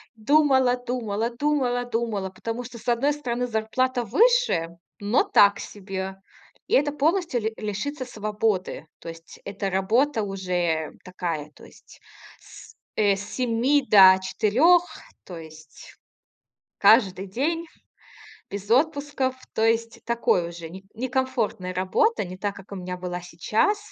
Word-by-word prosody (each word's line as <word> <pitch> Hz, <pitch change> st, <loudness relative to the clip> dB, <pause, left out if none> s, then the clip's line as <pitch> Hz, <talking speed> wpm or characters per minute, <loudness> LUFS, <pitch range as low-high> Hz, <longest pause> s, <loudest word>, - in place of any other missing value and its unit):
Думала-думала, 245 Hz, -4 st, +1 dB
думала-думала. 245 Hz, -6 st, -1 dB
Потому 230 Hz, +6 st, -5 dB
что, 240 Hz, 0 st, -10 dB
с 235 Hz, -, -15 dB
одной 245 Hz, +5 st, +2 dB
стороны, 250 Hz, -4 st, -3 dB
зарплата 245 Hz, +3 st, -1 dB
выше, 440 Hz, -, +2 dB, 0.3 s
но 205 Hz, -, +2 dB
так 205 Hz, -, +4 dB
себе. 190 Hz, -1 st, -6 dB, 0.5 s
И -, -, -4 dB
это 290 Hz, +2 st, +3 dB
полностью 320 Hz, -2 st, 0 dB
ли 220 Hz, +1 st, -2 dB
лишиться 240 Hz, +7 st, -4 dB
свободы. 210 Hz, -7 st, -2 dB
То 165 Hz, -, -8 dB
есть 165 Hz, 0 st, -12 dB
это 200 Hz, 0 st, -3 dB
работа 220 Hz, +6 st, +1 dB
уже 180 Hz, -5 st, -2 dB
такая. 165 Hz, -5 st, -4 dB
То -, -, -15 dB
есть -, -, -18 dB, 0.4 s
с, -, -, -15 dB, 0.2 s
э, 205 Hz, -2 st, +3 dB
с 195 Hz, -, -6 dB
7 255 Hz, +5 st, +1 dB
до 190 Hz, -2 st, +8 dB
4. 260 Hz, -, +3 dB, 0.4 s
То 175 Hz, -3 st, -8 dB
есть 155 Hz, -1 st, -13 dB, 0.8 s
каждый 200 Hz, -3 st, +4 dB
день, 320 Hz, -, -2 dB, 0.8 s
без 200 Hz, +1 st, -7 dB
отпусков. 285 Hz, -1 st, +1 dB, 0.2 s
То 220 Hz, -, +1 dB
есть 230 Hz, 0 st, 0 dB
такой 225 Hz, -7 st, +1 dB
уже 170 Hz, -1 st, -8 dB
не 190 Hz, +2 st, -11 dB
некомфортная 245 Hz, -6 st, -2 dB
работа. 190 Hz, -, +1 dB
Не 185 Hz, 0 st, -9 dB
так, 200 Hz, +1 st, -3 dB
как 200 Hz, 0 st, -13 dB
у 200 Hz, -, -5 dB
меня 180 Hz, 0 st, -5 dB
была 180 Hz, 0 st, -5 dB
сейчас. 210 Hz, -, 0 dB
220 Hz, 130 wpm, -24 LUFS, 190-260 Hz, 0.8 s, до